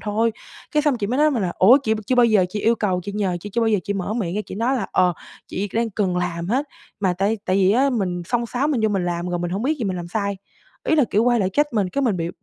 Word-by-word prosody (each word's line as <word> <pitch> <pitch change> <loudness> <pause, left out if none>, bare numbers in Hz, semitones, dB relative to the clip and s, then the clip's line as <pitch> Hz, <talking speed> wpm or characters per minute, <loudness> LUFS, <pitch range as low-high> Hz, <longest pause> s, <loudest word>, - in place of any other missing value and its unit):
thôi." 220 +2 0 0.4
Cái 300 - +2
xong 290 -4 +2
chị 205 - -1
mới 250 +5 -1
nói 305 +1 +4
mình 240 -8 -1
là 175 - -1
"Ủa, 240 +9 +7
chị 220 -4 +1
chưa 255 - +1
bao 245 -1 +5
giờ 215 -5 +4
chị 210 +3 -4
yêu 230 +3 +3
cầu, 195 -5 -1
chị 200 - -5
nhờ, 195 -3 -1
chị 205 - -8
chưa 235 - -1
bao 225 - +2
giờ 210 -3 +2
chị 205 - -1
mở 195 +2 -3
miệng 185 -7 -2
ra - - 0
chị - - -7
nói 235 +6 0
là, 245 - -2
ờ, 180 -1 +3 0.4
'chị 200 +2 -3
đang 230 0 0
cần 190 -3 -1
làm 175 -1 -2
hết'.", 260 +7 +1 0.4
mà 190 -3 +2
tại 200 +5 0
tại 185 - +2
vì 190 0 +4
á 270 +5 +3
mình 185 -7 -1
xông 240 +5 -1
xáo 255 +5 -1
mình 280 -6 0
vô 220 - +3
mình 195 -3 -1
làm 175 0 -2
rồi 175 - -2
mình 175 0 -3
hông 195 +4 -2
biết 300 +5 0
rồi 225 - -1
mình 185 - -2
làm 175 -1 -6
sai, 200 +1 -2 0.5
Ý 315 - +4
là, 295 - +5
kiểu, 215 +3 +2
quay 240 -2 +3
lại 190 -1 0
trách 295 +7 +1
mình, 205 -5 +1
cái 280 +9 -2
mình 230 -7 +1
bị 165 -1 -2
210 Hz, 315 wpm, -22 LUFS, 185-240 Hz, 0.5 s, Ủa